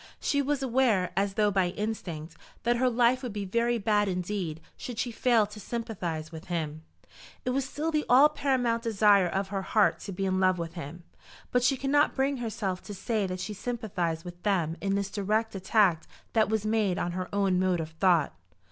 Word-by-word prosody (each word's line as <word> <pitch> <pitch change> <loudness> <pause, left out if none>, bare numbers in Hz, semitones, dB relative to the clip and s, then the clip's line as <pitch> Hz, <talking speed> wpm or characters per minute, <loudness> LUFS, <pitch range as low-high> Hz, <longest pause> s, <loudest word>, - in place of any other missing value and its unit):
She 285 - +1
was 280 0 -1
aware, 240 -7 +2
as 195 +1 0
though 210 -2 +3
by 190 -2 +2
instinct, 175 -6 -5 0.3
that 240 +1 +2
her 255 +1 +3
life 245 +1 +3
would 245 -5 -5
be 205 -1 -3
very 235 +4 +1
bad 210 -1 +2
indeed 180 -3 -3 0.2
should 245 -3 -7
she 240 +1 -1
fail 230 -2 +3
to 210 +1 -11
sympathise 180 -8 -4
with 160 -1 -9
him. 155 -3 -3 0.6
It 250 - +1
was 270 +1 0
still 315 +4 -2
the 305 -1 +1
all 265 +4 +8
paramount 250 -6 0
desire 210 -4 +4
of 195 +2 -2
her 195 -1 -2
heart 210 +2 +2
to 200 - -7
be 195 +1 -2
in 185 0 +1
love 185 -1 +3
with 165 -1 -5
him. 170 0 -8 0.5
But 250 - +3
she 260 +2 +2
could 270 +1 -2
not 290 +1 +3
bring 275 +1 +1
herself 205 -6 -3
to 205 - -7
say 205 +1 -1
that 185 0 -4
she 210 +4 -4
sympathised 200 -8 -3
with 175 0 -9
them 175 -6 0
in 195 0 0
this 200 0 -2
direct 215 +2 0
attack 190 -3 +2 0.3
that 220 -2 +3
was 220 -1 0
made 215 -4 +1
on 175 - -1
her 185 +1 -4
own 195 -2 +2
mode 185 -2 +1
of 160 0 -4
thought. 165 - +2
205 Hz, 205 wpm, -28 LUFS, 180-235 Hz, 0.6 s, all